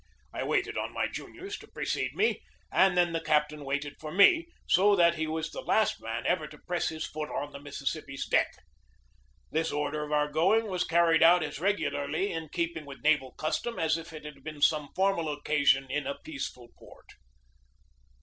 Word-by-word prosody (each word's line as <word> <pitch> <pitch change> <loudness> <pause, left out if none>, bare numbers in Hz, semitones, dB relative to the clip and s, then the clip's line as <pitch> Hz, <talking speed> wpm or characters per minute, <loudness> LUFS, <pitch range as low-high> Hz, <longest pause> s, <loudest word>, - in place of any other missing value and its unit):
I - - -3
waited 420 +1 0
on - - -4
my - - +1
juniors 390 +3 -7
to - - -14
precede - - -3
me, 445 - +1 0.3
and 190 -2 +4
then 175 -1 +3
the 165 - -1
captain 150 -1 +1
waited 140 +1 -3
for 155 -1 -7
me, 325 - +5 0.2
so 200 +3 +5
that 170 -3 +5
he 160 -1 -2
was 160 +1 -3
the - - -6
last 220 - +1
man 115 +1 -4
ever 160 -4 +1
to 150 0 -13
press 175 +3 -2
his 160 0 -4
foot 150 0 -5
on 145 +1 -4
the 140 - -9
Mississippi's 140 0 -4
deck. - - +2 1.0
This 160 +1 0
order 150 +1 -2
of 150 - -7
our 150 0 +2
going 180 +10 +3
was 185 -4 -1
carried 165 -1 +4
out 175 +1 +7
as 145 -2 -5
regularly 155 -1 0
in 165 -2 -5
keeping 170 -2 -3
with 140 0 -10
naval 150 -4 +2
custom 230 +9 -2
as 160 -1 +2
if 165 0 -7
it 155 -1 -10
had 150 -1 -10
been 155 -1 -7
some 150 -2 +3
formal 185 -5 +1
occasion 145 -2 +2
in 150 - -1
a 140 - -3
peaceful 280 - -7
port. - - -17
155 Hz, 190 wpm, -29 LUFS, 150-180 Hz, 1.0 s, out